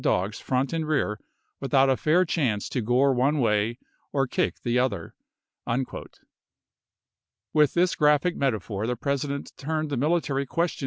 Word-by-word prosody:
dogs 95 +4 0
front 130 +4 -1
and 160 -2 -1
rear 135 -8 0 0.4
without 135 -1 +3
a 130 - +4
fair 165 +7 +3
chance 125 - 0
to 125 - -2
gore 125 +5 +3
t*jg$j*I 125 0 +1
one 145 +2 +2
way 110 -1 +1 0.3
or 135 -1 +1
kick 125 - -1
the 120 +1 +1
other." 105 -10 -1 2.4
With 150 -2 +3
this 180 +1 +3
graphic 150 +4 +3
Junes^ses. - - -10
metaphor 110 -5 -1
the 125 - 0
President 140 +2 -3
turned 155 +1 -2
the 140 - -1
military 140 -1 0
question 170 +5 -1
Xxvii. - - -11
135 Hz, 160 wpm, -26 LUFS, 120-150 Hz, 2.4 s, a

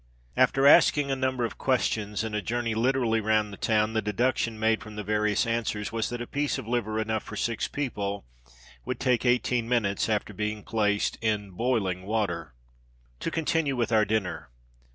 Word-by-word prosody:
After 130 +2 +3
asking 145 0 +6
a - - +1
number 130 -2 0
of 115 - -7
questions, 110 -5 0
and 110 -1 -4
a 105 - 0
journey 115 +3 -1
literally 115 -1 +1
"round 110 -1 +1
the - - -6
town," 110 0 +1
the 110 - +1
deduction 115 +2 0
made 110 0 +1
from 105 -1 -10
the 105 - -4
various 105 0 +1
answers 115 -3 -2
was 115 -1 -1
that 120 0 -4
a - - -7
piece 145 +3 -1
of - - -7
liver 110 -2 -1
enough 110 0 -1
for 105 - -9
six 115 +1 -1
people 100 - -3 0.6
would - - -4
take 125 0 +1
eighteen 120 -1 +1
minutes, 110 -4 +1
after 105 -1 -1
being 105 +1 -3
placed 105 -2 0
in 105 -3 -1
boiling 95 -3 0
water. 90 - -2 0.6
To - - -2
continue 160 -3 0
with 120 -2 -1
our 110 -1 +5
dinner. 100 - -2
110 Hz, 180 wpm, -27 LUFS, 105-120 Hz, 0.6 s, asking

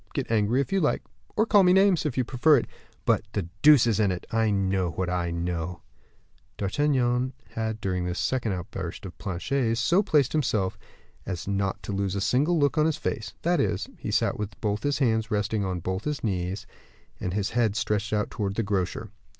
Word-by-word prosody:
Get - - -2
angry 110 +4 +2
if 140 - -4
you 195 - +3
like, 150 - +1 0.3
or 220 - +3
call 205 -3 +5
me 180 -1 +5
names, 190 -4 +4
if 135 - -4
you 130 - +3
prefer 135 +5 +4
it; 120 - 0 0.4
but, - - +3
the 100 - 0 0.2
deuce 150 -5 +7
is 115 -2 +1
in 105 -2 +3
it. 90 - -5
I 115 -1 +2
know 95 -2 +1
what 90 +2 -2
I 90 -1 -1
know." 85 0 -3 0.7
D'Artagnan 125 +2 +1 0.2
had, 110 -1 -3
during 90 -4 -1
this 90 +1 -3
second 120 -6 0
outburst 90 0 -6
of 90 - -8
Planchet's, 115 +5 -1
so 170 - +3
placed 150 - +2
himself 110 -11 0 0.5
as 90 -2 -4
not 100 -1 -1
to - - -5
lose 100 -1 -1
a - - 0
single 145 - +2
look 145 0 +2
of 155 +1 +4
his 155 -1 0
face; - - -4
that 175 -1 +2
is, 100 -8 0
he - - -5
sat - - +1
with 105 -2 -5
both 105 -1 -1
his 145 0 0
hands 110 -5 +1
resting 105 0 0
on 90 -2 -2
both 95 +3 -3
his 150 -1 -2
knees, 95 -1 -2 0.5
and 90 +1 -3
his 105 0 -1
head 115 -3 +1
stretched 110 -1 -1
out 105 -1 0
towards 100 -2 -2
the 115 - 0
grocer. 95 -4 -2
110 Hz, 205 wpm, -26 LUFS, 95-135 Hz, 0.7 s, deuce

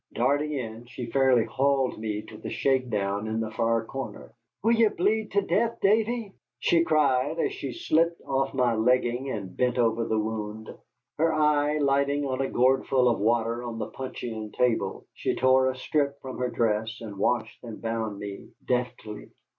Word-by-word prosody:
Darting 145 +5 +1
in, 120 -3 -5
she 120 -2 -7
fairly 130 -3 +4
hauled 135 -2 +1
me 105 -1 -3
to 110 - -12
the - - -7
shake 130 -2 +1
down 100 0 -1
in 110 +1 -1
the 110 -1 -3
far 115 0 +1
corner. 135 -3 -7 0.3
"Will 225 - +4
ye 230 -1 +5
bleed 210 +2 0
to 200 0 +3
death, 230 +4 +1
Davy?" 220 +1 +1 0.2
she 170 -1 +3
cried, 145 -1 +2
as 410 - 0
she 385 -4 -5
slipped 170 - +1
off 135 0 0
my 125 -2 +2
legging 125 +3 +1
and 100 -7 -5
bent 125 -1 +1
over 115 -1 +2
the 110 - 0
wound. 110 0 -4 0.5
Her 165 +1 +3
eye 150 -1 +2
lighting 140 0 +1
on 130 -1 -1
a 135 - -1
gourdful 130 0 +3
of 120 - +2
water 115 +2 +1
on 120 -2 -5
the - - -4
puncheon 115 -4 -6
table, 115 -6 0
she - - -2
tore 130 +1 +4
a 130 - -3
strip 140 +1 -1
from 130 -2 -7
her 125 0 0
dress 110 0 0
and 105 -3 -8
washed 110 0 -1
and 115 -3 -8
bound 115 -2 -3
me 100 -1 -7 0.2
deftly. 125 -4 -3
125 Hz, 180 wpm, -27 LUFS, 110-140 Hz, 0.5 s, ye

